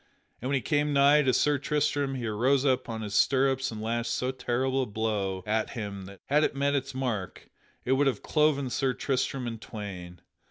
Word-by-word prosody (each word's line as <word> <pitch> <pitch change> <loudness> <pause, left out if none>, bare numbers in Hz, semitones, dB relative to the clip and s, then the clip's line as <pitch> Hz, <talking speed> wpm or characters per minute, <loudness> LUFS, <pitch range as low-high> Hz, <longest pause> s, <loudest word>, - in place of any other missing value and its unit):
And 130 - -3
when 140 - +1
he 135 - +1
came 145 +4 +1
nigh 140 +2 +6
to 130 -3 +2
Sir 145 +2 +2
Tristram 145 -1 0
he 125 -2 -4
arose 125 +6 +2
up 130 -3 +1
on 110 -1 -4
his 105 -1 -5
stirrups 135 +3 +2
and 110 - -6
lashed 115 +1 -1
so 125 +2 -1
terrible 130 +1 -1
a 130 - -2
blow 100 -3 -2
at 110 +1 0
him 100 -3 -5
that, 100 0 -12
had 150 +2 +3
it - - 0
met 140 +1 +1
its 135 -2 -2
mark, 120 -8 -4 0.3
it 125 - 0
would 135 +2 +3
have 135 - -1
cloven 150 -4 +2
Sir 130 -1 0
Tristram 135 -1 -1
in 115 -2 -5
twain. 90 -5 -8
130 Hz, 205 wpm, -28 LUFS, 110-140 Hz, 0.3 s, nigh